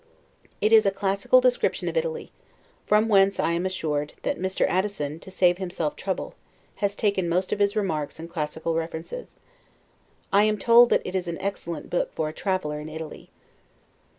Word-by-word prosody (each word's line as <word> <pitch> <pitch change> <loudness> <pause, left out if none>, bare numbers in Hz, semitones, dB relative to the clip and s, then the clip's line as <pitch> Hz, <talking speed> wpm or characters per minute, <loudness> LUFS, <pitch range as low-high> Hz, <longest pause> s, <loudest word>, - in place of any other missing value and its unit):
It 215 +2 +3
is 220 -2 +7
a - - +6
classical 195 - +2
description - - +1
of - - -3
Italy; 480 -1 -2 0.6
from 210 +1 +4
whence, 195 -2 +4
I 165 - +2
am 170 +2 0
assured, 150 -5 -2
that - - -1
Mr. 190 +1 0
Addison, 180 -6 -1
to 190 - -12
save 180 -1 +2
himself 175 -5 -2
trouble, 190 -1 -4 0.4
has 200 0 -1
taken 200 -5 0
most 180 +2 0
of - - -3
his 200 +1 +2
remarks 160 -9 -2
and 165 +1 -8
classical 160 0 -3
references. 165 - -5 1.0
I 205 +1 +6
am 215 0 +1
told 235 +3 +6
that - - +2
it 180 - -5
is 185 -2 -1
an 170 -1 -3
excellent 170 -5 -4
book 175 - 0
for 155 - -1
a - - -8
traveler 175 -6 -2
in 150 +1 -7
Italy. 160 0 -8
185 Hz, 180 wpm, -25 LUFS, 165-205 Hz, 1.0 s, is